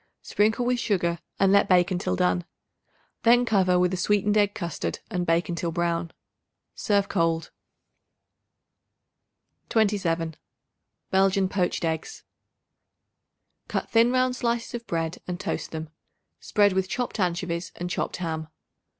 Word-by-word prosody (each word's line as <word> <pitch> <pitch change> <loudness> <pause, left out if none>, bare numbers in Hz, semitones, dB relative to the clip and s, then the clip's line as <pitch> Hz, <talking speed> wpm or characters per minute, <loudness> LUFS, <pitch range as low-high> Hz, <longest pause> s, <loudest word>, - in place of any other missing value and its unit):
Sprinkle 220 +4 +1
with 250 0 +1
sugar 175 -6 0 0.2
and 195 0 +4
let 200 0 +4
bake 180 0 +4
until 175 - -1
done. 90 0 +1 0.8
Then 240 +1 +5
cover 190 -5 +3
with 180 0 +2
a - - -1
sweetened 205 +2 +2
egg 205 -1 +3
custard 170 -2 -3
and 180 -1 -2
bake 165 +1 +2
until 170 -1 -2
brown. 170 0 -1 0.6
Serve 200 -1 +1
cold. 165 -1 0 2.2
27. 175 -7 +1 0.7
Belgian 195 0 +3
Poached 180 -3 -1
Eggs. 160 - -3 1.4
Cut - - -3
thin 230 +1 +5
round 255 0 +2
slices 235 -1 -2
of 235 -1 -6
bread 165 0 -2
and 180 -1 -4
toast - - -3
them. 160 -1 -6 0.5
Spread 205 -2 +2
with 190 0 0
chopped 245 -3 -3
anchovies 175 -2 -1
and 175 - -4
chopped 175 - -3
ham. 160 -3 -3
185 Hz, 130 wpm, -26 LUFS, 170-210 Hz, 2.2 s, Then